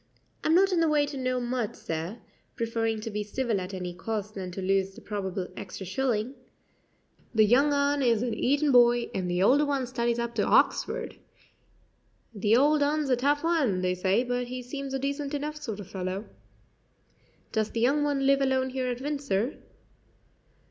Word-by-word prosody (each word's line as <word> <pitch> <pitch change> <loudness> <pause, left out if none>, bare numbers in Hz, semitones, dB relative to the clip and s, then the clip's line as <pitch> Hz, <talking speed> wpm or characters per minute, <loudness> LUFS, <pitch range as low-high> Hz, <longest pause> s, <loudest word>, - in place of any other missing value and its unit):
"I'm 320 - +3
not 385 +2 +5
in 350 - +2
the 330 -1 +3
way 295 -1 +3
to 290 0 -7
know 255 -1 -1
much, 240 -3 -2
sir" 165 +7 -4 0.4
preferring 225 -1 -1
to 225 - -5
be 210 0 -2
civil 215 -1 -1
at 180 +1 -6
any 180 -2 -5
cost 210 +2 -4
than 190 -3 -5
to 180 - -7
lose 195 0 0
the - - -10
probable 190 -3 -4
extra 190 0 -7
shilling 240 +3 -1 1.0
"the 215 -1 +6
young 270 +7 +4
un 285 0 +2
is 235 -3 +2
an 240 -2 -1
Eton 285 +6 +2
boy, 240 -1 +5
and 185 -2 -2
the 175 +1 +1
older 275 +8 +5
one 280 -3 0
studies 240 -1 -1
up 235 0 -2
to 215 -3 0
Hoxford. - - +2 1.2
The 215 +2 +3
old 295 +3 +4
un's 290 -1 +1
a - - +5
tough 290 +5 +1
un, 280 - +2
they 180 0 +1
say, 190 +5 +1
but 245 0 -2
he 250 0 -5
seems 275 +1 -5
a - - +1
decent 280 +1 -3
enough 300 +1 -4
sort 225 -9 -5
of 200 - -8
fellow." 190 +2 -4 1.3
"Does 220 -1 0
the 230 - -3
young 275 +6 +3
one 285 -2 0
live 275 0 +4
alone 260 -1 +1
here 260 -1 -2
at 250 0 -3
Windsor?" 275 -5 -2
245 Hz, 185 wpm, -28 LUFS, 205-280 Hz, 1.3 s, the